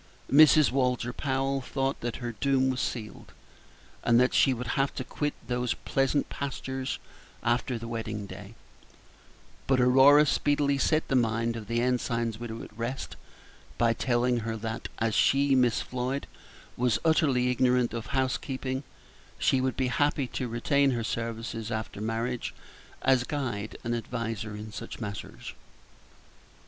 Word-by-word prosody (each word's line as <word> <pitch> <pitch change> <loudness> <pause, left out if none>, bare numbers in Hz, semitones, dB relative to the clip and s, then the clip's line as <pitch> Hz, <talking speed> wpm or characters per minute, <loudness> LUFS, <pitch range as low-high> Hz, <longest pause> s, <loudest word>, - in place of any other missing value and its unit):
Mrs. 155 0 +7
Walter 125 -2 0
Powell 135 0 -1
thought 135 +1 -2
that 120 0 -3
her 120 -2 -4
doom 130 +3 +1
was 125 - -2
sealed, 110 -3 -5 0.7
and 120 0 +4
that 125 +1 +3
she 135 - +5
would 125 -1 -3
have 135 +2 +1
to - - -3
quit 150 -1 -3
those 125 -1 0
pleasant 135 +1 0
pastures 135 -1 -4 0.5
after 120 +1 0
the 115 0 -7
wedding 110 -2 -4
day; 100 +2 -10 1.1
but 130 -1 +3
Aurora 135 +4 +7
speedily 145 -1 +1
set 155 +2 +2
the 135 - 0
mind 115 -1 +1
of 110 -3 -7
the 115 +1 0
ensign's 120 -2 0
widow 115 -1 -6
at - - -12
rest 115 +4 -4 0.6
by 115 0 +3
telling 120 0 +1
her 115 0 -3
that 110 +1 -4
as 110 -1 0
she, 140 +4 +3
Miss 125 -3 +3
Floyd, 130 +2 -3 0.5
was 125 -2 +2
utterly 135 -6 +3
ignorant 125 -1 +2
of 115 -1 -4
housekeeping, 130 0 -1 0.6
she 130 - +2
would 130 -1 -1
be 130 -1 +1
happy 145 +1 +1
to 125 - -3
retain 140 +4 +2
her 120 -3 -1
services 115 0 -4
after 110 -2 -4
marriage 115 +2 -2 0.5
as 130 -2 +4
guide 120 -7 -3
and 120 - -1
adviser 115 -3 -4
in 105 +1 -7
such - - -7
matters. 105 -3 -6
125 Hz, 145 wpm, -28 LUFS, 115-135 Hz, 1.1 s, Mrs